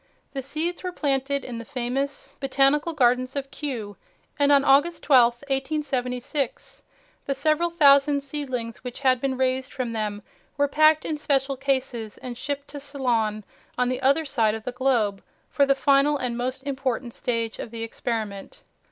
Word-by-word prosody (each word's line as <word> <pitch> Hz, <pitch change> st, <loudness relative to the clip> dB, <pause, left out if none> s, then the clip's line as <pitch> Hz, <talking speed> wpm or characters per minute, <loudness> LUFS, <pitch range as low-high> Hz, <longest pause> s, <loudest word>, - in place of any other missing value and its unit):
The 270 Hz, -, -3 dB
seeds 310 Hz, +6 st, -3 dB
were 365 Hz, -, -3 dB
planted 280 Hz, -3 st, -1 dB
in 235 Hz, -2 st, -5 dB
the -, -, -6 dB
famous 270 Hz, +2 st, -3 dB
Botanical 275 Hz, +4 st, +2 dB
Gardens 255 Hz, -1 st, +2 dB
of 275 Hz, -1 st, -4 dB
Kew, 230 Hz, -9 st, -5 dB, 0.4 s
and 285 Hz, 0 st, +4 dB
on 280 Hz, -1 st, +5 dB
August 290 Hz, +5 st, +3 dB
12, 245 Hz, -4 st, +6 dB
1876, 270 Hz, -1 st, -2 dB, 0.5 s
the 275 Hz, -, 0 dB
several 310 Hz, +5 st, +1 dB
thousand 280 Hz, -3 st, +5 dB
seedlings 260 Hz, -6 st, -4 dB
which 250 Hz, 0 st, -7 dB
had 255 Hz, -2 st, +3 dB
been 265 Hz, -1 st, -1 dB
raised 260 Hz, +1 st, 0 dB
from 255 Hz, -3 st, -3 dB
them 210 Hz, -2 st, -3 dB, 0.3 s
were 285 Hz, 0 st, +3 dB
packed 310 Hz, +2 st, +4 dB
in 305 Hz, -1 st, -2 dB
special 275 Hz, -2 st, 0 dB
cases 260 Hz, -5 st, -2 dB
and 250 Hz, -1 st, -7 dB
shipped 285 Hz, +3 st, -4 dB
to 290 Hz, -, -7 dB
Ceylon 240 Hz, -7 st, -1 dB, 0.3 s
on 250 Hz, 0 st, +2 dB
the 255 Hz, +1 st, -2 dB
other 280 Hz, +4 st, +3 dB
side 225 Hz, -6 st, +1 dB
of 220 Hz, -, -7 dB
the 250 Hz, -, -3 dB
globe 240 Hz, -6 st, +1 dB, 0.3 s
for 280 Hz, -1 st, +3 dB
the 275 Hz, -, +4 dB
final 280 Hz, +2 st, +3 dB
and 250 Hz, -3 st, -2 dB
most 255 Hz, +2 st, -3 dB
important 265 Hz, -3 st, -2 dB
stage 230 Hz, -3 st, -2 dB
of -, -, -5 dB
the 225 Hz, 0 st, -5 dB
experiment. 225 Hz, -, -4 dB
270 Hz, 165 wpm, -25 LUFS, 245-285 Hz, 0.5 s, 12